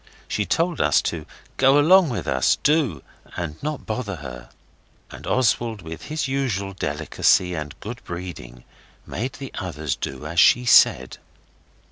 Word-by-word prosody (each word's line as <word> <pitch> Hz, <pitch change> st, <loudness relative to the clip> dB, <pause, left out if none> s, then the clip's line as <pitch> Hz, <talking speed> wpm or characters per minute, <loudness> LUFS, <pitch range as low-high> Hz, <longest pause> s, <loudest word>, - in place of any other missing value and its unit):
She 105 Hz, -3 st, -2 dB
told 170 Hz, -, 0 dB
us -, -, +4 dB
to 80 Hz, -2 st, -7 dB, 0.3 s
go 135 Hz, +2 st, +5 dB
along 170 Hz, +3 st, +6 dB
with 115 Hz, -, -3 dB
us, 65 Hz, -1 st, +2 dB
do, 140 Hz, -, +1 dB, 0.3 s
and 80 Hz, -3 st, -5 dB
not 150 Hz, 0 st, -4 dB
bother 110 Hz, -3 st, -3 dB
her. 65 Hz, -5 st, -9 dB, 0.6 s
And -, -, -10 dB
Oswald, 115 Hz, -4 st, +1 dB
with 80 Hz, +6 st, -8 dB
his 155 Hz, 0 st, -2 dB
usual 120 Hz, -8 st, -2 dB
delicacy 90 Hz, +3 st, +1 dB
and 75 Hz, -3 st, -6 dB
good 120 Hz, +4 st, -7 dB
breeding, 85 Hz, -9 st, -8 dB, 0.4 s
made 125 Hz, +4 st, -4 dB
the 135 Hz, -2 st, -8 dB
others 80 Hz, -7 st, -3 dB
do 65 Hz, +3 st, -6 dB
as 85 Hz, +2 st, -1 dB
she 125 Hz, +1 st, +5 dB
said. 65 Hz, -, +5 dB
95 Hz, 145 wpm, -23 LUFS, -, 0.6 s, along